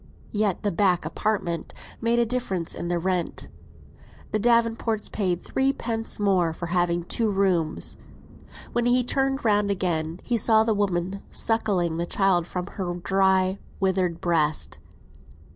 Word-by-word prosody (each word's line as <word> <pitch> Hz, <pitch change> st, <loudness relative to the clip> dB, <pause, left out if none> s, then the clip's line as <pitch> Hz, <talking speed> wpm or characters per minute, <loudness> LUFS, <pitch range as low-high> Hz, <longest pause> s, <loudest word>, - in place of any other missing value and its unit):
Yet 205 Hz, -3 st, 0 dB
the 205 Hz, -, +1 dB
"back 180 Hz, 0 st, +2 dB
apartment" 185 Hz, -6 st, -2 dB, 0.3 s
made 230 Hz, +1 st, +2 dB
a 235 Hz, -, +4 dB
difference 220 Hz, -8 st, -2 dB
in -, -, -5 dB
the 175 Hz, 0 st, 0 dB
rent. 180 Hz, 0 st, -2 dB, 0.8 s
The 215 Hz, -, +1 dB
Davenports 230 Hz, -1 st, +1 dB
paid 180 Hz, -4 st, -1 dB
threepence 235 Hz, -5 st, -1 dB
more 185 Hz, -5 st, +2 dB
for 170 Hz, -, -5 dB
having 175 Hz, -1 st, +1 dB
two 220 Hz, +5 st, 0 dB
rooms. 185 Hz, -5 st, 0 dB, 0.8 s
When 240 Hz, 0 st, +1 dB
he 250 Hz, +1 st, +4 dB
turned 270 Hz, +1 st, 0 dB
round 205 Hz, -2 st, +3 dB
again, 170 Hz, -4 st, -1 dB
he 240 Hz, -, 0 dB
saw 220 Hz, 0 st, +4 dB
the 220 Hz, 0 st, +1 dB
woman 195 Hz, -1 st, -1 dB
suckling 195 Hz, -7 st, 0 dB
the 170 Hz, +1 st, -2 dB
child 185 Hz, -3 st, +2 dB
from 180 Hz, 0 st, -3 dB
her 180 Hz, -2 st, -4 dB
dry, 190 Hz, +1 st, +2 dB, 0.2 s
withered 185 Hz, -3 st, +1 dB
breast. 160 Hz, -3 st, 0 dB
195 Hz, 140 wpm, -25 LUFS, 175-225 Hz, 0.8 s, a